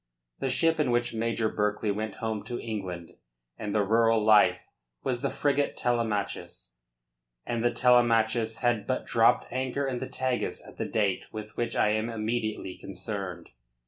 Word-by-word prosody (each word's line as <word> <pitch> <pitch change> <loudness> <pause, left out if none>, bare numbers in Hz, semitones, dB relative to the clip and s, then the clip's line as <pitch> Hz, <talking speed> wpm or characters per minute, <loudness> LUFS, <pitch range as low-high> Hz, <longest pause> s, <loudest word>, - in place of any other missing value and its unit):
The 135 - -1
ship 165 +5 +2
in 150 - +2
which 120 0 +1
Major 115 0 0
Berkeley 105 0 0
went 105 +1 -3
home 110 -2 -3
to 120 - -4
England 95 -7 -5 0.5
and 105 -2 -3
the 105 - +3
rural 115 +2 +4
life 100 -4 +5 0.4
was 125 -2 -1
the 140 - 0
frigate 145 0 0
Telemachus, 105 - -2 0.7
and 115 -1 -2
the 120 - +4
Telemachus 115 -2 +3
had 120 -4 +1
but - - -1
dropped - - +3
anchor 130 +2 -1
in 125 -2 -2
the - - -4
Tagus 130 -1 -2
at - - -14
the - - -2
date 100 -4 0
with 105 -1 -7
which 120 - -2
I - - +3
am 110 +2 0
immediately 110 -3 -3
concerned. 95 -3 -6
115 Hz, 160 wpm, -28 LUFS, 105-120 Hz, 0.7 s, life